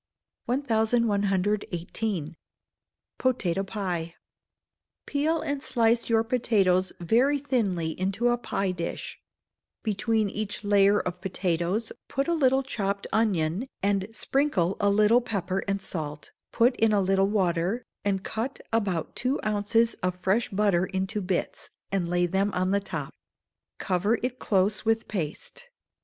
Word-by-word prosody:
1118. 210 - 0 0.8
Potato 200 -8 +1
Pie. 180 -5 -3 0.9
Peel 315 +3 0
and 285 -1 -2
slice 235 -1 +2
your 225 -1 +3
potatoes 205 -6 +2
very 240 - +3
thinly 205 - 0
into 195 +6 +1
a 240 - +3
pie 195 -5 -1
dish; 170 -2 -5 0.6
between 215 0 +1
each 205 +1 -4
layer 205 0 +4
of 180 0 -4
potatoes 185 +3 -1 0.2
put 275 +3 -1
a 340 - +2
little 270 -4 +3
chopped 200 -6 -2
onion, 195 0 +1 0.2
and 200 -1 +1
sprinkle 225 - +1
a 205 - +3
little 215 +4 +4
pepper 195 -5 -2
and 200 0 0
salt; 150 -3 -5 0.2
put 245 +2 +3
in 225 -1 +3
a 205 - +3
little 195 0 +3
water, 190 +2 0 0.2
and 195 -1 0
cut 235 +5 -4
about 190 -8 0
two 255 +3 0
ounces 215 +2 +2
of 180 0 0
fresh 190 +6 +1
butter 195 -3 +2
into 190 +3 -2
bits, 185 -1 -2 0.2
and 185 -3 0
lay 175 0 +2
them 190 +3 +1
on 185 +1 +1
the 200 - +3
top; 200 - -5 0.6
cover 200 +4 +1
it 250 0 -2
close 195 +1 +1
with 225 0 +1
paste. 190 - -5
205 Hz, 130 wpm, -27 LUFS, 185-230 Hz, 0.9 s, layer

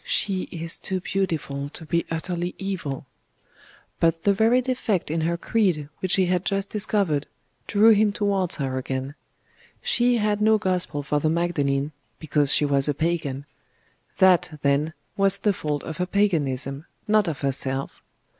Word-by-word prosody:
'She 200 - 0
is 165 -1 -2
too 190 -1 -2
beautiful 160 -7 -2
to 160 - -10
be 170 +2 -1
utterly 175 +2 -3
evil'; 185 -9 -4 0.9
but 165 0 +2
the 200 - +4
very 225 +5 +4
defect 245 - -1
in 160 0 0
her 170 +2 0
creed 175 -8 0
which 185 -1 +1
he 190 - +3
had 180 0 0
just 195 0 -1
discovered, 195 -8 0 0.4
drew 215 +2 +5
him 210 -1 +4
towards 200 -3 +1
her 135 -3 -2
again. 130 +1 -4 0.7
She 245 0 +3
had 210 -1 0
no 220 +1 +5
Gospel 180 -7 -1
for 145 +1 0
the 155 - +1
Magdalene, 150 -4 0 0.3
because 145 -2 +1
she 150 - +3
was 140 -1 +3
a 145 - 0
Pagan.... 145 -4 -2 0.7
That, 180 -4 +4
then, 145 +3 +1 0.2
was 195 0 +2
the 205 0 +1
fault 150 -5 -3
of 160 - -6
her 180 - -1
Paganism, 145 -8 0 0.2
not 215 -2 +3
of 160 -4 -3
herself. 135 0 -2
170 Hz, 155 wpm, -24 LUFS, 145-200 Hz, 0.9 s, drew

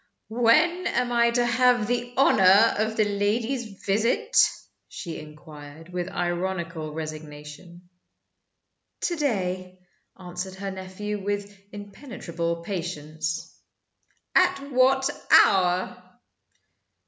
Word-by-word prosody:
"When 305 +11 +3
am 245 -6 0
I 235 0 +3
to 240 +1 +1
have 245 -1 +3
the 245 +1 -2
honor 210 -4 +5
of 220 +1 -1
the 215 - +3
lady's 215 +2 -2
visit?" 230 - 0 0.5
she 170 -4 -7
inquired, 150 +1 -12
with 180 0 -4
ironical 175 -3 -3
resignation. 155 +3 -9 1.1
"To 345 - -1
day," 185 - -2 0.4
answered 180 +1 -6
her 195 +1 -5
nephew, 190 +2 -6
with 205 0 -3 0.2
impenetrable 190 - -5
patience. 160 -3 -5 0.8
"At 280 +1 +2
what 265 +1 +3 0.4
hour?" 180 -1 0
195 Hz, 95 wpm, -25 LUFS, 170-235 Hz, 1.1 s, honor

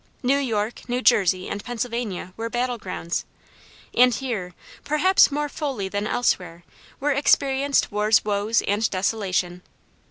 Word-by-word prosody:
New 270 +3 +3
York, 225 -2 -3
New 245 +1 -1
Jersey, 185 -3 +3
and 200 0 -5
Pennsylvania 235 -6 -4
were 230 +1 -4
battle 245 0 -2
grounds, 180 -3 -4 0.7
and 250 +1 +5
here, 215 -10 -4 0.3
perhaps 365 +6 +4
more 295 +1 -2
fully 270 -10 -4
than 205 +2 -2
elsewhere, 180 -9 -1 0.4
were 290 +2 +1
experienced 280 0 +2
war's 210 +1 +2
woes 210 +2 +1
and 210 +2 0
desolation. 185 -2 -1
225 Hz, 130 wpm, -23 LUFS, 200-255 Hz, 0.7 s, and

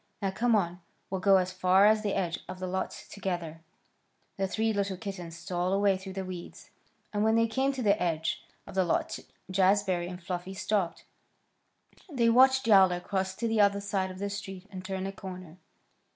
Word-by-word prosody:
Now 195 -2 -1
come 230 +4 +2
on! 180 -3 0 0.3
We'll 190 -1 -2
go 195 0 +6
as 185 0 0
far 185 +2 +4
as 215 0 +5
the 205 -2 -1
edge 175 -2 -1
of 185 - -6
the 185 - -4
lot 190 +1 -2 0.2
together." 175 -5 -4 0.8
The 195 0 0
three 220 +3 0
little 200 -2 -1
kittens 180 -4 -7
stole 175 +1 -2
away 200 0 +3
through 190 0 -8
the 190 0 -4
weeds, 180 -2 -9 0.4
and 205 0 +1
when 220 +1 +3
they 230 0 +4
came 265 +4 +1
to 260 -2 -4
the 200 -2 +3
edge 165 -2 -1 0.2
of - - -10
the 190 0 +3
lot 170 - -1 0.3
Jazbury 185 -2 +2
and 180 -1 -7
Fluffy 180 +1 -5
stopped. 190 -3 -1 1.1
They 235 -5 +3
watched 260 +2 +5
Yowler 190 -5 +6
cross 190 0 -2
to 230 - -2
the 225 -1 +3
other 200 0 +4
side 200 -2 -1
of 185 - -8
the 200 +1 -3
street 195 -2 -7
and 185 -1 -7
turn 190 0 -3
a 195 - -3
corner. 185 -3 -9
190 Hz, 195 wpm, -29 LUFS, 185-205 Hz, 1.1 s, go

